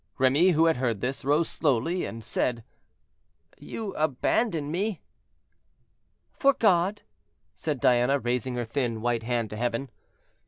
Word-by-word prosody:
Remy, 140 +8 +4
who 160 +1 +4
had 165 -4 +3
heard 120 -5 -1
this, 130 +5 -3
rose 150 +4 +2
slowly, 155 +5 0
and 115 0 -7
said, 115 0 -1 1.0
"You 215 -3 -6
abandon 155 - 0
me?" 195 +2 -1 1.3
"For 275 -1 +3
God," 195 -1 +2 0.5
said 150 -4 -3
Diana, 125 +3 +3
raising 125 0 -2
her 120 -1 -2
thin 115 -2 -2
white 120 -1 0
hand 115 -2 -2
to 105 - -6
heaven. 120 +3 -2
135 Hz, 130 wpm, -27 LUFS, 120-165 Hz, 1.3 s, Remy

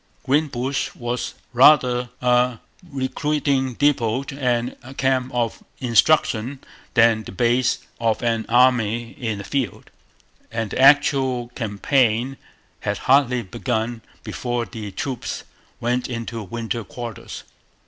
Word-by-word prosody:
Greenbush 135 -2 0
was 120 0 -3 0.2
rather 125 -2 +5
a 125 0 +3 0.3
recruiting 135 -1 0
depot 130 -3 +2
and 125 -3 -1 0.2
camp 130 -1 +1
of 120 -2 -2
instruction 125 0 +2 0.4
than 115 -2 +5
the - - -9
base 120 +4 +2 0.2
of 115 -1 0
an 115 -1 0
army 120 -2 +3
in 115 -6 -4
the 100 - -6
field; 130 -7 -3 0.6
and 115 -2 -3
the - - -3
actual 135 -3 +4
campaign 120 +2 0 0.4
had 105 0 -2
hardly 130 -2 +3
begun 115 +2 -3 0.2
before 120 -1 -3
the 110 -3 -7
troops 120 +6 -4 0.4
went 125 +2 -1
into 115 -1 -4
winter 115 +3 -4
quarters. 115 +1 -8
120 Hz, 110 wpm, -22 LUFS, 115-130 Hz, 0.6 s, rather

